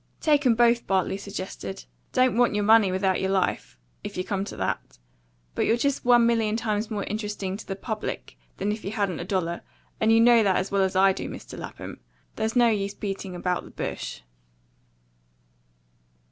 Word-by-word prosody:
"Take 295 Hz, -3 st, +3 dB
'em 235 Hz, -, +5 dB
both," 235 Hz, 0 st, +3 dB
Bartley 190 Hz, 0 st, +1 dB
suggested. 190 Hz, -, -6 dB, 0.3 s
"Don't 255 Hz, -2 st, +3 dB
want 240 Hz, -2 st, +3 dB
your 210 Hz, -, +1 dB
money 215 Hz, -2 st, +5 dB
without 190 Hz, 0 st, +1 dB
your 190 Hz, -, 0 dB
life, 190 Hz, -, -1 dB, 0.3 s
if -, -, -6 dB
you 185 Hz, -, -1 dB
come 195 Hz, +1 st, -2 dB
to -, -, -7 dB
that. -, -, -3 dB, 0.6 s
But -, -, 0 dB
you're 230 Hz, -, +3 dB
just 280 Hz, +3 st, 0 dB
one 240 Hz, -1 st, +5 dB
million 225 Hz, -2 st, +2 dB
times 215 Hz, -1 st, -1 dB
more 210 Hz, -3 st, -2 dB
interesting 205 Hz, -3 st, -3 dB
to 225 Hz, -, -11 dB
the 195 Hz, -, -3 dB
public 215 Hz, +2 st, -5 dB, 0.2 s
than 200 Hz, +2 st, -1 dB
if 215 Hz, +1 st, -5 dB
you 200 Hz, -, -4 dB
hadn't 200 Hz, -6 st, -1 dB
a 175 Hz, -, -4 dB
dollar; 175 Hz, -3 st, -1 dB, 0.4 s
and 220 Hz, 0 st, +3 dB
you 225 Hz, -, +6 dB
know 235 Hz, 0 st, +6 dB
that 195 Hz, -3 st, +3 dB
as 185 Hz, -, -1 dB
well 200 Hz, 0 st, +2 dB
as 190 Hz, -1 st, +1 dB
I 190 Hz, +1 st, +5 dB
do, -, -, -5 dB
Mr. -, -, -9 dB
Lapham. -, -, -8 dB, 0.4 s
There's 220 Hz, +1 st, -2 dB
no 240 Hz, -1 st, +5 dB
use 200 Hz, -2 st, -1 dB
beating 195 Hz, -2 st, -5 dB
about 180 Hz, 0 st, -1 dB
the -, -, -12 dB
bush." -, -, -5 dB
205 Hz, 190 wpm, -26 LUFS, 190-225 Hz, 0.6 s, you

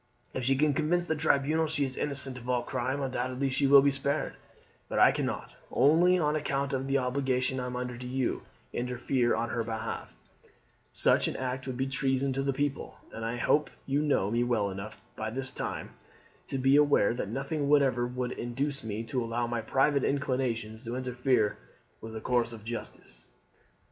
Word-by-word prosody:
If 130 Hz, -, -3 dB
she 135 Hz, +1 st, +4 dB
can 150 Hz, +2 st, +3 dB
convince 165 Hz, +4 st, +1 dB
the 160 Hz, -, 0 dB
tribunal 155 Hz, +1 st, +2 dB
that 155 Hz, -, -3 dB
she 145 Hz, -3 st, +1 dB
is 130 Hz, -1 st, -5 dB
innocent 140 Hz, -3 st, 0 dB
of 120 Hz, +1 st, -9 dB
all 125 Hz, -1 st, +1 dB
crime, 130 Hz, +3 st, -2 dB
undoubtedly 130 Hz, +1 st, -1 dB
she 140 Hz, +1 st, +2 dB
will 140 Hz, 0 st, +8 dB
be 140 Hz, -, +4 dB
spared; 140 Hz, +2 st, -1 dB, 0.6 s
but -, -, -2 dB
I -, -, +7 dB
cannot, -, -, -3 dB
only 165 Hz, +7 st, +5 dB
on 150 Hz, -3 st, +1 dB
account 140 Hz, -2 st, -1 dB
of 135 Hz, 0 st, -1 dB
the 135 Hz, 0 st, +2 dB
obligation 130 Hz, 0 st, 0 dB
I 125 Hz, -, -3 dB
am 125 Hz, -, -5 dB
under 125 Hz, 0 st, -3 dB
to 125 Hz, -, -6 dB
you, 130 Hz, 0 st, -1 dB, 0.3 s
interfere 125 Hz, 0 st, 0 dB
on 115 Hz, -, -1 dB
her 115 Hz, -, -1 dB
behalf; 110 Hz, -1 st, -4 dB, 0.8 s
such -, -, +3 dB
an -, -, -3 dB
act 130 Hz, +1 st, -3 dB
would 130 Hz, -2 st, -4 dB
be 130 Hz, -, 0 dB
treason 135 Hz, 0 st, 0 dB
to 135 Hz, -, -1 dB
the 135 Hz, 0 st, +1 dB
people, 140 Hz, 0 st, -2 dB, 0.2 s
and 115 Hz, -, -6 dB
I 115 Hz, +2 st, -2 dB
hope 150 Hz, +5 st, +2 dB, 0.2 s
you 140 Hz, +2 st, +1 dB
know 140 Hz, -10 st, +1 dB
me 120 Hz, +1 st, +2 dB
well 110 Hz, -5 st, +1 dB
enough 100 Hz, +3 st, -7 dB, 0.2 s
by 110 Hz, 0 st, -3 dB
this 130 Hz, +3 st, -3 dB
time -, -, -4 dB, 0.6 s
to 135 Hz, -, -2 dB
be 135 Hz, +2 st, +4 dB
aware 145 Hz, -8 st, +4 dB
that 120 Hz, -4 st, -4 dB
nothing 140 Hz, +4 st, -2 dB
whatever 135 Hz, -4 st, +3 dB
would 125 Hz, 0 st, -3 dB
induce 135 Hz, +4 st, -3 dB
me 110 Hz, 0 st, -3 dB
to 120 Hz, +2 st, -2 dB
allow 115 Hz, +1 st, -1 dB
my 120 Hz, -1 st, -2 dB
private 135 Hz, +5 st, +2 dB
inclinations 125 Hz, -5 st, -1 dB
to 120 Hz, +1 st, -4 dB
interfere 125 Hz, -3 st, +1 dB, 0.4 s
with 110 Hz, 0 st, -8 dB
the 110 Hz, -, -5 dB
course 120 Hz, -1 st, +1 dB
of 110 Hz, -2 st, -10 dB
justice. 120 Hz, 0 st, -8 dB
130 Hz, 195 wpm, -29 LUFS, 120-140 Hz, 0.8 s, will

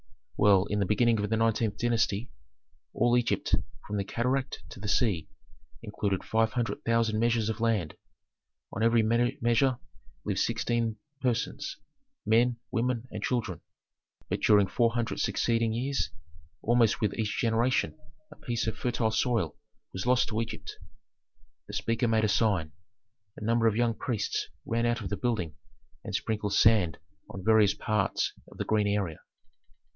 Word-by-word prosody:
"Well, 100 Hz, -2 st, +5 dB
in 105 Hz, 0 st, -1 dB
the 100 Hz, -, +1 dB
beginning 115 Hz, +1 st, +3 dB
of 105 Hz, 0 st, -1 dB
the 110 Hz, -, +1 dB
nineteenth 110 Hz, -2 st, +1 dB
dynasty, 115 Hz, -1 st, 0 dB, 0.6 s
all 120 Hz, 0 st, +2 dB
Egypt, 120 Hz, -1 st, 0 dB, 0.3 s
from 105 Hz, -, -3 dB
the 100 Hz, -, 0 dB
cataract 125 Hz, +6 st, -2 dB
to -, -, -10 dB
the 105 Hz, -, -5 dB
sea, 95 Hz, -5 st, +1 dB, 0.6 s
included 100 Hz, -2 st, -2 dB
five 110 Hz, -1 st, +1 dB
hundred 120 Hz, -2 st, -2 dB
thousand 115 Hz, -2 st, +1 dB
measures 115 Hz, -1 st, +2 dB
of 110 Hz, 0 st, -3 dB
land. 110 Hz, -9 st, +1 dB, 0.8 s
On 105 Hz, -, -3 dB
every 115 Hz, 0 st, +4 dB
measure 120 Hz, +2 st, +2 dB, 0.5 s
lived -, -, -1 dB
sixteen 115 Hz, -2 st, 0 dB, 0.3 s
persons: 130 Hz, +4 st, -2 dB, 0.5 s
men, 120 Hz, +2 st, +3 dB
women, 125 Hz, 0 st, -1 dB
and -, -, -5 dB
children. 115 Hz, -, -2 dB, 0.7 s
But -, -, -1 dB
during 105 Hz, -2 st, +5 dB
four 115 Hz, +4 st, +1 dB
hundred 120 Hz, -2 st, -1 dB
succeeding 115 Hz, +2 st, +1 dB
years 135 Hz, +4 st, -1 dB, 0.5 s
almost 115 Hz, -1 st, +3 dB
with 105 Hz, -2 st, +1 dB
each 110 Hz, -2 st, -2 dB
generation 115 Hz, +2 st, +1 dB, 0.4 s
a -, -, -11 dB
piece 120 Hz, -1 st, -2 dB
of 110 Hz, -1 st, -2 dB
fertile 120 Hz, -2 st, 0 dB
soil 110 Hz, -, 0 dB, 0.4 s
was 95 Hz, +5 st, -4 dB
lost 125 Hz, 0 st, +3 dB
to 110 Hz, 0 st, -1 dB
Egypt." 115 Hz, -, -7 dB, 0.9 s
The -, -, -9 dB
speaker 115 Hz, +1 st, 0 dB
made 110 Hz, -1 st, +2 dB
a -, -, +3 dB
sign. 100 Hz, -7 st, +1 dB, 0.7 s
A -, -, -7 dB
number 115 Hz, +1 st, +3 dB
of 110 Hz, -, +2 dB
young 120 Hz, 0 st, +2 dB
priests 110 Hz, -3 st, -2 dB, 0.2 s
ran 115 Hz, +1 st, 0 dB
out 120 Hz, -1 st, 0 dB
of 95 Hz, -, -4 dB
the -, -, -2 dB
building 95 Hz, -11 st, -1 dB, 0.5 s
and -, -, -4 dB
sprinkled 105 Hz, -2 st, -1 dB
sand 105 Hz, -7 st, +4 dB, 0.3 s
on 95 Hz, -1 st, -8 dB
various 110 Hz, -2 st, +5 dB
parts 105 Hz, -3 st, 0 dB, 0.2 s
of -, -, -14 dB
the -, -, -3 dB
green 105 Hz, -1 st, +2 dB
area. 100 Hz, -6 st, -1 dB
115 Hz, 155 wpm, -29 LUFS, 105-120 Hz, 0.9 s, Well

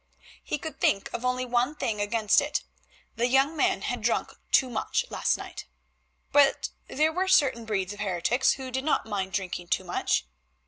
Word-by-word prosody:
He -, -, -2 dB
could 315 Hz, +2 st, -7 dB
think 195 Hz, -, +1 dB
of 235 Hz, -, -4 dB
only 250 Hz, 0 st, 0 dB
one 250 Hz, +4 st, +1 dB
thing 215 Hz, -7 st, -2 dB
against 210 Hz, +2 st, +3 dB
it, 295 Hz, +1 st, -2 dB, 0.5 s
the 235 Hz, +1 st, +2 dB
young 270 Hz, +5 st, +3 dB
man -, -, +1 dB
had -, -, -2 dB
drunk -, -, 0 dB, 0.2 s
too 265 Hz, -, +5 dB
much 370 Hz, -, -1 dB
last -, -, +1 dB
night. -, -, -8 dB, 0.6 s
But 285 Hz, -1 st, +4 dB, 0.2 s
there 310 Hz, +2 st, +1 dB
were 375 Hz, +3 st, 0 dB
certain 275 Hz, -11 st, +3 dB
breeds 200 Hz, -3 st, -2 dB
of 205 Hz, -, -12 dB
heretics 205 Hz, +6 st, +1 dB
who 265 Hz, -1 st, -7 dB
did 265 Hz, +1 st, -2 dB
not 305 Hz, -, +1 dB
mind 195 Hz, -3 st, -3 dB
drinking 185 Hz, -2 st, -3 dB
too -, -, 0 dB
much. -, -, 0 dB
250 Hz, 180 wpm, -27 LUFS, 205-285 Hz, 0.6 s, too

